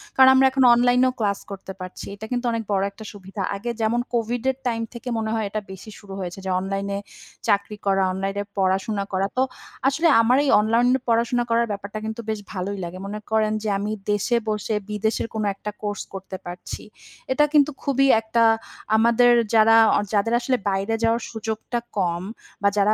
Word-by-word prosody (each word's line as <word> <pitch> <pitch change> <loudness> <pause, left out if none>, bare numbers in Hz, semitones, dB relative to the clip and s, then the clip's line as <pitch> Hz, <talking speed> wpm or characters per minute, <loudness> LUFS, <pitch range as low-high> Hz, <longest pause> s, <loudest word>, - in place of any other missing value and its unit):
কারণ 260 0 +8
আমরা 265 0 +6
এখন 265 -1 +2
অনলাইনেও 250 +1 +4
ক্লাস 200 -2 0
করতে 195 0 -7
পারছি। 185 0 -7
এটা 215 +2 -8
কিন্তু 245 0 -1
অনেক 230 -1 -2
বড় 195 -1 +2
একটা 220 +2 -12
সুবিধা। 195 0 -8
আগে 230 +5 -5
যেমন 225 +2 +1
COVID 235 0 0
এর 260 - -13
টাইম 230 -1 -1
থেকে 245 +1 -7
মনে 220 -1 -2
হয়, 220 -2 -1
এটা 215 +1 -3
বেশি 190 +3 -10
শুরু 195 -2 -11
হয়েছে। 180 +1 -5
যে - - -2
অনলাইন-এ 195 +1 -3 0.5
চাকরি 205 +1 +1
করা, 195 -1 +3
অনলাইন-এ 195 +1 -2
পড়াশোনা 195 +2 +1
করা। 195 +1 +1
তো, - - +4 0.5
আসলে 320 +5 +2
আমার 245 +3 +4
এই 280 - +1
অনলাইন 230 +3 +2 0.2
পড়াশোনা 235 +1 +2
করার 230 0 +3
ব্যাপারটা 200 +1 -5
কিন্তু 220 +1 -4
বেশ 215 -1 -1
ভালোই 195 +2 -3
লাগে। 175 +2 -6
মনে 210 +1 -5
করেন 215 -1 +2
যে 215 - -1
আমি 205 +2 -3 0.2
দেশে 205 +4 +1
বসে 210 0 -1
বিদেশের 220 +2 -1
কোনো 215 -1 -1
একটা 210 +2 -6
কোর্স 205 -1 -3
করতে 190 0 -7
পারছি। 175 +1 -7 0.5
এটা 295 +3 +4
কিন্তু 295 0 +5
খুবই 275 -1 +2
একটা 230 +1 +1 0.5
আমাদের 235 +2 +5 0.2
যারা 225 +1 +6 0.2
অ - - +3
যাদের 210 +3 +2
আসলে 255 +1 0
বাইরে 195 +3 0
যাওয়ার 230 +1 +2
সুযোগটা 220 +2 -3 0.2
কম 175 -2 0 0.4
বা 200 - +5
যারা 205 +2 +4
215 Hz, 185 wpm, -23 LUFS, 200-235 Hz, 0.5 s, কারণ